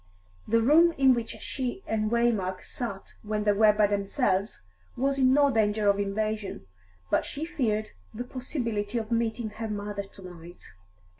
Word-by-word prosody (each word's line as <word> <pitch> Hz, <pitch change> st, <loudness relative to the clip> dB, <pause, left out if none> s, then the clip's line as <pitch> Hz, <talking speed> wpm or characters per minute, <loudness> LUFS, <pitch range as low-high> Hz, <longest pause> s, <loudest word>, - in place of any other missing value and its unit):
The 230 Hz, +1 st, +3 dB
room 330 Hz, +6 st, +6 dB
in 265 Hz, -1 st, +6 dB
which 235 Hz, -2 st, -2 dB
she 260 Hz, +8 st, -4 dB
and 215 Hz, -1 st, -1 dB
Waymark 220 Hz, -6 st, 0 dB
sat 215 Hz, -6 st, -6 dB
when 210 Hz, 0 st, -2 dB
they 210 Hz, -, +4 dB
were 210 Hz, +1 st, +5 dB
by 210 Hz, 0 st, +3 dB
themselves 200 Hz, -, 0 dB, 0.3 s
was 275 Hz, +2 st, +1 dB
in 260 Hz, -1 st, +5 dB
no 285 Hz, +1 st, +4 dB
danger 210 Hz, -2 st, +1 dB
of 200 Hz, -, -3 dB
invasion, 210 Hz, -, -2 dB, 0.5 s
but -, -, +3 dB
she 295 Hz, +3 st, -5 dB
feared 220 Hz, -11 st, -1 dB, 0.2 s
the 230 Hz, +2 st, -5 dB
possibility 240 Hz, -4 st, -3 dB
of 225 Hz, 0 st, -4 dB
meeting 230 Hz, -1 st, -1 dB
her 225 Hz, +1 st, -5 dB
mother 205 Hz, -1 st, -3 dB
to 195 Hz, 0 st, -14 dB
night. 175 Hz, -1 st, -12 dB
220 Hz, 160 wpm, -27 LUFS, 205-245 Hz, 0.5 s, room